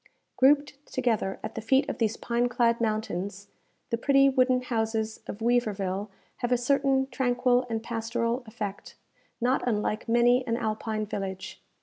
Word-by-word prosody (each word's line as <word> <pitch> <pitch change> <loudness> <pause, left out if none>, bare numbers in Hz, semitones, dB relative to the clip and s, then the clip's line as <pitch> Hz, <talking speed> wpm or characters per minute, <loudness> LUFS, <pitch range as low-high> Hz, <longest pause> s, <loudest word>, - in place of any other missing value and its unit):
Grouped 285 +1 +3
together 230 -7 0
at - - -5
the 225 - -5
feet 265 +5 +2
of - - -4
these 225 -1 +1
pine 240 +1 0
clad 235 -1 +2
mountains, 200 -3 -2 0.4
the 230 - 0
pretty 275 +1 +5
wooden 255 -1 +2
houses 220 -2 -1
of 205 - -7
Weaverville 205 -4 0 0.3
have 240 - -2
a 245 - +4
certain 270 +1 +2
tranquil 250 -1 +1
and 225 -1 -2
pastoral 230 +1 -2
effect, 210 -3 -6 0.4
not 250 +2 +2
unlike 215 0 -1
many 240 +2 +4
an 230 0 0
Alpine 215 -1 -2
village. 190 -2 -5
235 Hz, 145 wpm, -27 LUFS, 215-250 Hz, 0.4 s, pretty